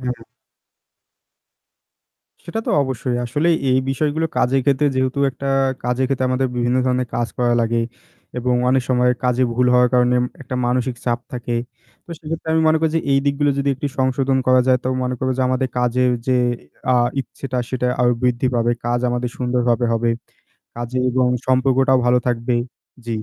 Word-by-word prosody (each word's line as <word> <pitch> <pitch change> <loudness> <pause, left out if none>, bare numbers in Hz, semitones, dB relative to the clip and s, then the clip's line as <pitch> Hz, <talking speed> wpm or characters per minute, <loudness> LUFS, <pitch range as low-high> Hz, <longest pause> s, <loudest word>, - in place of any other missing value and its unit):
হুম। 125 -2 -5 2.2
সেটা 220 +6 -3
তো - - 0
অবশ্যই 130 -2 -2
আসলে 145 +8 0 0.2
এই 130 - +4
বিষয়গুলো 155 +4 0
কাজের 135 +2 +2
ক্ষেত্রে 140 +1 +2
যেহেতু 130 +1 0
একটা 140 +1 -7 0.4
কাজের 125 +2 0
ক্ষেত্রে 130 -1 0
আমাদের 130 0 +1
বিভিন্ন 120 +1 +1
ধরনের 125 -1 0
কাজ 120 0 -1
করা 120 -1 +2
লাগে 115 0 +1 0.6
এবং 125 0 0
অনেক 130 0 +3
সময় 125 -1 +3
কাজে 125 0 +2
ভুল 125 +1 +2
হওয়ার 125 0 +5
কারণে 125 0 +3 0.3
একটা 130 -1 -6
মানসিক 125 0 0
চাপ 120 -1 0
থাকে 120 -1 -3 0.5
তো - - -14
সেক্ষেত্রে 160 0 -6
আমি 160 - +3
মনে 160 - +3
করি 160 - +1
যে 165 - +2
এই 135 - +4
দিকগুলো 140 +1 +2
যদি 140 0 0
একটু 135 +3 -4
সংশোধন 130 +1 +1
করা 130 0 +5
যায় 130 -1 +4
তো - - 0
মনে 125 0 -1
করবো 130 0 0
যে - - +2
আমাদের 130 0 0
কাজের 125 +1 +2 0.2
যে 130 - +2 0.5
অ্যা 130 - +3 0.3
ইচ্ছেটা 130 -1 -6
সেটা 125 -1 -1
আরও 120 0 +4
বৃদ্ধি 125 0 +1
পাবে 120 0 +2 0.2
কাজ 120 0 +1
আমাদের 120 0 -2
সুন্দরভাবে 125 -1 +1
হবে 115 +1 +1 0.7
কাজে 120 +2 -4
এবং 125 0 +2 0.2
সম্পর্কটাও 130 0 +3
ভালো 125 0 +4
থাকবে। 120 +1 0 0.5
জী। - - -7
125 Hz, 170 wpm, -20 LUFS, 125-130 Hz, 2.2 s, হওয়ার